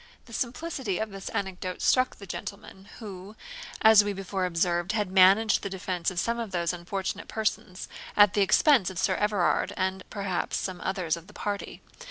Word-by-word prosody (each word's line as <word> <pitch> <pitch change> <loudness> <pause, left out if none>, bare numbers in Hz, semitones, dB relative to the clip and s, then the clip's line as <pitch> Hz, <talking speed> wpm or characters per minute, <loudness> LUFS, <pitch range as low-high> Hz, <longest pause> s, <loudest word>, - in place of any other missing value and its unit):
] - - -33
The 230 - -14
simplicity 250 - -3
of 220 -1 -3
this 195 0 -7
anecdote 185 -2 -4
struck 255 0 +2
the 200 - -11
gentleman, 195 +1 -8
who, 200 -2 -9 0.5
as 220 -1 +8
we 205 0 -2
before 190 -1 -2
observed, 175 +2 0
had 210 -4 -1
managed 195 +3 +5
the 200 - -4
defence 185 -2 -2
of 180 -2 -3
some 235 +5 -1
of 230 -2 -4
those 175 -2 -1
unfortunate 185 +2 -4
persons, 215 -4 -3 0.3
at 205 -2 +7
the 205 - +2
expense 215 - +4
of 190 - -9
Sir 190 +1 +2
Everard, 205 -2 +1
and 190 0 -1
perhaps 195 -3 -2
some 185 -2 -4
others 185 -4 -1
of 170 +1 -12
the 210 - -15
party. 205 -1 -5
195 Hz, 185 wpm, -27 LUFS, 185-210 Hz, 0.5 s, as